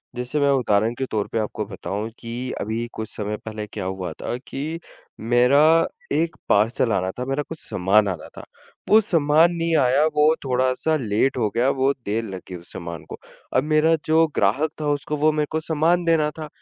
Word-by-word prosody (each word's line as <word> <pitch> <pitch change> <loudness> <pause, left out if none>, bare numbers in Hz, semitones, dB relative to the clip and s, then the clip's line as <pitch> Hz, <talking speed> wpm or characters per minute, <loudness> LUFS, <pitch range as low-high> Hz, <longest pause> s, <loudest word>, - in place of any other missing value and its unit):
जैसे 125 +5 -2
मैं 140 0 +3
उदाहरण 115 -3 +2
के 130 - -2
तौर 105 -2 -1
पर 115 - +1
आपको 105 0 -3
बताऊँ 100 +2 -5
कि 120 +2 -5
अभी 110 +3 -2
कुछ 110 -1 -6
समय 105 0 -3
पहले 110 -1 -5
क्या 100 -3 -6
हुआ 95 -3 -4
था, 120 - -4
कि 150 +5 -5 0.4
मेरा 140 +8 +4 0.3
1 165 +1 0
पार्सल 115 +3 +2
आना 95 0 0
था। 125 - -2
मेरा 135 +2 -1
कुछ 160 - -7
सामान 100 +3 +2
आना 90 -5 -4
था। - - -8 0.5
वो 215 - +8
सामान 165 -3 +3
नहीं 165 -1 0
आया 135 +3 +3
वो 150 0 +4 0.2
थोड़ा-सा 130 +4 +1
लेट 120 +2 0
हो 110 -3 +1
गया, 125 +3 +3
वो 135 0 +2
देर 110 +3 -1
लग 95 -3 -7
गई 90 - -6
उस 85 0 -12
सामान 85 -3 -7
को। - - -7 0.4
अब 130 - +3
मेरा 155 +2 +3
जो 160 +1 +4
ग्राहक 120 +11 +2
था 150 - -1
उसको 145 +1 -2
वो 155 +2 +3
मेरे 150 -1 -1
को 160 - 0
सामान 165 +3 +1
देना 160 -2 +3
था 155 - -5
130 Hz, 200 wpm, -23 LUFS, 105-155 Hz, 0.5 s, वो